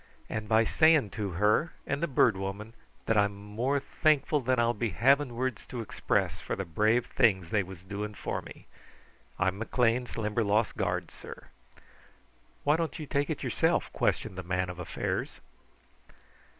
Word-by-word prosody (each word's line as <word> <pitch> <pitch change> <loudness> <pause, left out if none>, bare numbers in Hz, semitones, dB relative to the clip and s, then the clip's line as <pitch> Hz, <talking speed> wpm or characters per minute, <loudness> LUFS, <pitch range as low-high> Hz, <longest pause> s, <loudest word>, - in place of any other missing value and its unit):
And 110 -1 -4
by 110 0 +5
saying 155 -2 +4
to 105 -5 -4
her 105 - +2
and 145 0 -2
the 170 - +1
Bird 125 -6 +3
Woman 95 +3 -5 0.3
that 115 -2 +3
I'm 100 0 +2
more 110 +8 -1
thankful 150 +1 +2
than 130 +1 +1
I'll 120 0 +3
be 115 0 -1
having 130 - +3
words 130 -2 -3
to 125 - -6
express 115 - -1
for - - -4
the 95 - -4
brave 110 +8 +2
things 95 -8 +2
they 105 - +3
was 95 -1 -9
doing 105 +2 -5
for - - -3
me. - - -13 0.7
I'm 95 +1 0
McLean's 120 +2 0
Limberlost 105 0 +1
guard, - - -2
sir." - - -11 1.1
"Why 150 +2 +3
don't 165 +1 -2
you 155 - -6
take 140 0 -1
it - - -3
yourself?" - - +1
questioned 95 - -1
the - - -2
Man 90 0 -1
of 90 - -11
Affairs. 90 - -3
110 Hz, 165 wpm, -29 LUFS, 100-130 Hz, 1.1 s, by